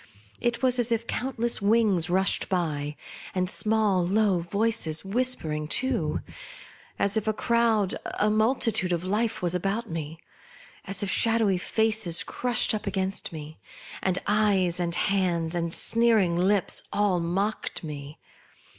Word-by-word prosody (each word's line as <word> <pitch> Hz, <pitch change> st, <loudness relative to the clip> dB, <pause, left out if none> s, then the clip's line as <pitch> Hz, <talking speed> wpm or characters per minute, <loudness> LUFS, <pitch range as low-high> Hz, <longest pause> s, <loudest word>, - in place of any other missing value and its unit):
It 240 Hz, +2 st, -1 dB
was 255 Hz, -1 st, +3 dB
as 240 Hz, 0 st, +1 dB
if 230 Hz, 0 st, 0 dB
countless 235 Hz, -2 st, -1 dB
wings 200 Hz, -5 st, +2 dB
rushed 190 Hz, +2 st, +1 dB
by, 150 Hz, -5 st, -2 dB, 0.4 s
and 185 Hz, 0 st, 0 dB
small 210 Hz, -2 st, +1 dB
low 195 Hz, 0 st, +2 dB
voices 185 Hz, -2 st, 0 dB
whispering 195 Hz, -9 st, -1 dB
too; 225 Hz, -, 0 dB, 0.8 s
as 200 Hz, +2 st, +1 dB
if 220 Hz, 0 st, -2 dB
a 215 Hz, -, +2 dB
crowd, 225 Hz, -3 st, +1 dB, 0.2 s
a 210 Hz, +1 st, +2 dB
mul 220 Hz, +5 st, +2 dB
titude 190 Hz, -7 st, +1 dB
of 170 Hz, 0 st, -2 dB
life 215 Hz, +3 st, -1 dB
was 175 Hz, -1 st, +1 dB
about 195 Hz, +5 st, -2 dB
me; 160 Hz, 0 st, -5 dB, 0.7 s
as 195 Hz, +1 st, -1 dB
if 200 Hz, -, -1 dB
shadowy 225 Hz, -5 st, +3 dB
faces 220 Hz, -4 st, +1 dB
crushed 245 Hz, -3 st, +1 dB
up 215 Hz, -, -4 dB
against 190 Hz, 0 st, -2 dB
me, 155 Hz, -1 st, -9 dB, 0.4 s
and 185 Hz, -1 st, +1 dB
eyes 200 Hz, -4 st, +1 dB
and 170 Hz, -1 st, 0 dB
hands, 180 Hz, -5 st, 0 dB
and 170 Hz, -1 st, -2 dB
sneering 225 Hz, -5 st, +2 dB
lips, 190 Hz, +2 st, +2 dB
all 200 Hz, -3 st, +1 dB
mocked 190 Hz, +6 st, -2 dB
me. 145 Hz, -1 st, -8 dB
195 Hz, 140 wpm, -26 LUFS, 175-220 Hz, 0.8 s, was